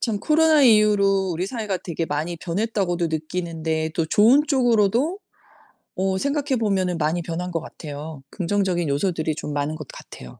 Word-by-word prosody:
참 220 -4 -1
코로나 310 +4 +4
이후로 205 -5 +4
우리 175 +3 -2
사회가 210 -5 -3
되게 165 -1 -3
많이 155 +4 -3
변했다고도 180 -1 -1
느끼는데 160 0 -3
또 165 - 0
좋은 230 - +5
쪽으로도 245 - +2 0.8
어 190 0 0
생각해 280 +2 -1
보면은 190 -5 0
많이 160 +2 0
변한 175 +2 -4
것 165 - -2
같아요. 150 -1 -8
긍정적인 180 -3 -1
요소들이 155 +1 -1
좀 150 -1 -5
많은 145 +2 -2
것 155 -3 -8
같아요. 60 -1 -12
180 Hz, 360 characters per minute, -23 LUFS, 160-215 Hz, 0.8 s, 좋은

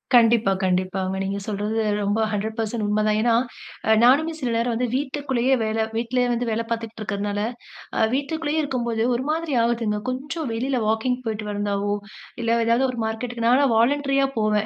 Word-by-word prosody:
கண்டிப்பா, 230 -3 +5
கண்டிப்பாங்க. 185 +1 0
நீங்க 195 +1 -2
சொல்றது 210 +1 -1 0.2
ரொம்ப 205 +2 +1
100% 220 +1 -2
உண்மதான். 210 0 +2
ஏனா, 235 0 +3 0.5
அ - - +4
நானுமே 290 +7 +5
சில 255 -4 -2
நேரம் 235 +1 +1
வந்து 250 +2 0
வீட்டுக்குள்ளேயே 265 -2 0
வேல 220 0 0
வீட்டிலயே 245 +2 +1
வந்து 240 +1 -1
வேல 225 +1 0
பார்த்துட்டுருக்கிறதனால, 215 -3 -3 0.6
அ - - +2
வீட்டுக்குள்ளேயே 310 +2 -1
இருக்கும்போது 235 -6 -1
ஒரு 245 - -2
மாதிரி 320 -1 -2
ஆகுதுங்க. 230 -3 0
கொஞ்சம் 280 +3 -4
வெளில 255 +3 -1
வாக்கிங் 225 +3 +1
போயிட்டு 215 -1 -3
வந்தாவோ, 205 0 -1 0.5
இல்ல 230 0 +2
ஏதாவது 235 +3 +3
ஒரு 250 -2 -4
மார்க்கெட்டுக்கு 230 +1 -3
நான்லாம் 260 +1 +4
வாலண்டரியா 275 +3 +2
போவேன். 215 -1 +2
230 Hz, 150 wpm, -23 LUFS, 215-255 Hz, 0.6 s, கண்டிப்பா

